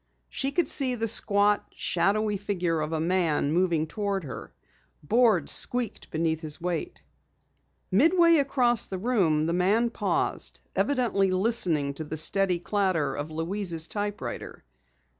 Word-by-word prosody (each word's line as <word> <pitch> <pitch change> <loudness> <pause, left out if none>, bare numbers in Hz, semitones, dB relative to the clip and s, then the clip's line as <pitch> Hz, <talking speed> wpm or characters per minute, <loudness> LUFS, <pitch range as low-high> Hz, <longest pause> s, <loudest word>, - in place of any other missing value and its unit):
She 270 0 -2
could 340 0 0
see 260 -3 +1
the 225 -1 -2
squat, 205 -1 +3
shadowy 210 +1 0
figure 180 -5 -2
of 155 +1 -3
a 160 - -1
man 165 -4 0
moving 170 -2 +1
toward 200 +1 -3
her. 135 - -8 0.5
Boards 215 -2 +2
squeaked 245 -2 +2
beneath 160 0 -1
his 155 -1 -1
weight. 180 - -4 0.9
Midway 335 - +4
across 255 -5 +2
the 190 - -6
room, 185 -9 +1
the 165 - -1
man 205 +7 +1
paused, - - -2
evidently 240 -8 +1
listening 185 -8 0
to 155 - -7
the 155 +1 -6
steady 185 +3 +1
clatter 175 -6 -1
of 145 +2 -5
Louise's 165 +1 -2
typewriter. 205 - -5
190 Hz, 135 wpm, -26 LUFS, 160-225 Hz, 0.9 s, Midway